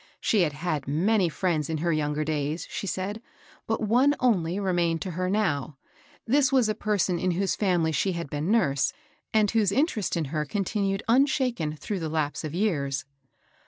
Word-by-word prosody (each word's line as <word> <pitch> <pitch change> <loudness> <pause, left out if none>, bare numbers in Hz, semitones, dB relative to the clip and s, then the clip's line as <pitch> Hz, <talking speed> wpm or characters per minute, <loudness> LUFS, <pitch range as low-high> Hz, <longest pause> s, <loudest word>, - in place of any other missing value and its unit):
She 215 - +2
had 155 -4 +1
had 150 -2 -3
many 180 +6 +2
fiiends 160 -3 -1
in 160 - -1
her 170 +2 0
younger 150 0 0
days, 155 +1 -2
she 200 - -4
said, 195 +4 -3 0.5
but 225 - -1
one 250 +7 +4
only 190 -7 +1
remained 175 -4 +1
to 185 - -4
her 185 +2 -2
now. 155 -9 0 0.5
This 275 +3 +3
was 260 -4 +4
a 215 - +1
person 200 -4 0
in 185 - 0
whose 195 0 0
family 175 -5 +1
she 185 +6 0
had 170 -2 -4
been 150 +5 -3
nurse, 145 -12 +2 0.4
and 215 -2 +3
whose 215 -4 +2
interest 230 - 0
in 165 - 0
her 155 -1 0
con 195 +7 -2
tinued 195 -1 -1
unshaken 245 - +2
through 195 +5 -4
the 160 -2 -3
lapse 155 -1 -2
of 155 +1 -5
years. 145 -9 0
180 Hz, 185 wpm, -26 LUFS, 155-215 Hz, 0.5 s, one